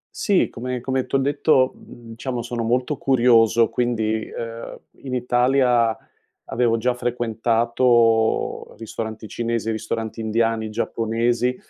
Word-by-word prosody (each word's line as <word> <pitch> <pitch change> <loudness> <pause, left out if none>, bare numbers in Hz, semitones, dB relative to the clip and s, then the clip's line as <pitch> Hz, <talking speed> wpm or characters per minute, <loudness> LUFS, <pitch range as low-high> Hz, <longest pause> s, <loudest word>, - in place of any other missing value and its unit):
Sì, 200 -3 +2
come 125 +1 -5
come 130 0 -1
t'ho - - 0
detto, 135 -1 +2
mhmm, 115 -1 -13
diciamo 125 0 -4
sono 120 0 -4
molto 125 +5 0
curioso, 120 -3 +4
quindi 110 -3 -1
ehm, 115 0 -7 0.2
in 130 -2 -5
Italia 125 -2 +2 0.5
avevo 115 0 +1
già 125 +2 0
frequentato 115 -1 +1
ristoranti 110 -1 -6
cinesi, 115 -1 -2
ristoranti 110 0 -4
indiani, 110 0 0
giapponesi, 115 +3 0
120 Hz, 115 wpm, -22 LUFS, 115-125 Hz, 0.5 s, curioso